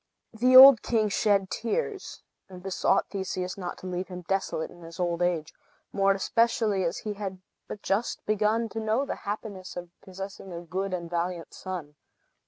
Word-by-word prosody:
The 250 +3 +3
old 265 -3 +11
king 220 -3 +1
shed 200 -2 +2
tears, 390 - -3 0.3
and 180 -1 -11
besought 190 -1 +1
Theseus 185 -2 -3
not 180 -3 -5
to - - -12
leave 185 0 -3
him 180 -1 -8
desolate 195 -4 -1
in 175 - -15
his 165 +1 -11
old 175 -1 -1
age, 170 -3 0 0.4
more 195 0 +3
especially 215 -1 +1
as 170 - -1
he 210 - -4
had 195 -2 -5 0.3
but 205 - -8
just 210 +5 -1
begun 215 +2 +1
to 225 - -5
know 220 +5 0
the - - -4
happiness 200 -4 -6
of 175 -1 -7
possessing 195 0 -8
a 170 - -6
good 185 +3 -3
and 175 -2 -3
valiant 175 0 -3
son. 170 -6 -7
195 Hz, 175 wpm, -27 LUFS, 180-215 Hz, 0.4 s, old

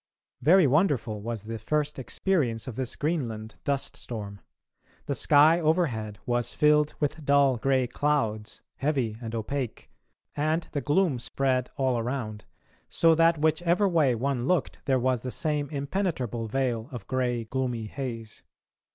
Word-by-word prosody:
Very 180 +2 +6
wonderful 130 - +1
was 115 -1 -4
the 115 +1 -5
first 150 +5 -1
experience 130 - -1
of 125 - -5
this 130 -1 -3
Greenland 115 -9 -2
dust 140 -1 -1
storm. 100 -4 -7 0.6
The 140 - -1
sky 150 +4 +5
overhead 140 - 0
was 120 -1 -1
filled 150 -1 +3
with 150 +1 -2
dull 140 -2 +4
grey 130 +2 +2
clouds, 120 -5 -1 0.2
heavy 135 -7 -1
and 115 -1 -5
opaque, 125 +2 -4 0.4
and 155 +3 0
the 145 - -2
gloom 150 -3 +2
spread 130 0 0
all 130 -3 +1
around, 115 -3 -4 0.4
so 165 -1 +4
that 165 +1 +4
whichever 170 +6 +2
way 155 -9 +3
one 130 +1 -1
looked 180 -2 0
there 135 -2 +3
was 125 -1 +1
the 125 - -4
same 145 +4 -1
impenetrable 140 - -2
veil 120 0 -1
of 120 -6 -7
grey 125 -2 -1
gloomy 125 -1 -2
haze. 115 -2 -6
130 Hz, 145 wpm, -27 LUFS, 115-150 Hz, 0.6 s, Very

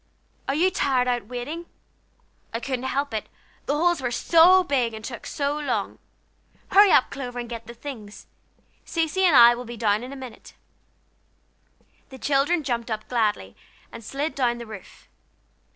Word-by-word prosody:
Are 275 - 0
you 360 +5 +3
tired 255 -6 +1
out 240 -4 -1
waiting? 280 +8 -6 0.9
I - - 0
couldn't 260 0 -4
help 280 +1 -2
it, 215 - -4 0.4
the 290 - +1
holes 345 -1 +2
were 250 - -1
so 340 +8 +5
big, 250 -8 0
and 220 0 -8
took 240 - -7
so 290 0 -2
long. 295 - -2 0.7
Hurry 405 +1 +7
up, 260 - +4
Clover, 250 -3 -6
and 240 -1 -4
get 230 -1 -8
the 235 - -9
things! 225 -7 -9 0.6
Cecy 330 +3 -1
and 340 -6 +5
I 240 -1 +9
will 240 +1 -6
be 240 -1 -8
down 210 -1 +1
in 255 - -8
a - - -7
minute." 260 -4 -11 1.5
The 265 - -11
children 290 +5 +1
jumped 240 -3 -2
up 215 -1 -4
gladly, 210 - -1 0.4
and 230 - -10
slid 285 +7 -3
down 245 -3 0
the 235 - -8
roof. 215 -4 -12
255 Hz, 170 wpm, -24 LUFS, 235-290 Hz, 1.5 s, I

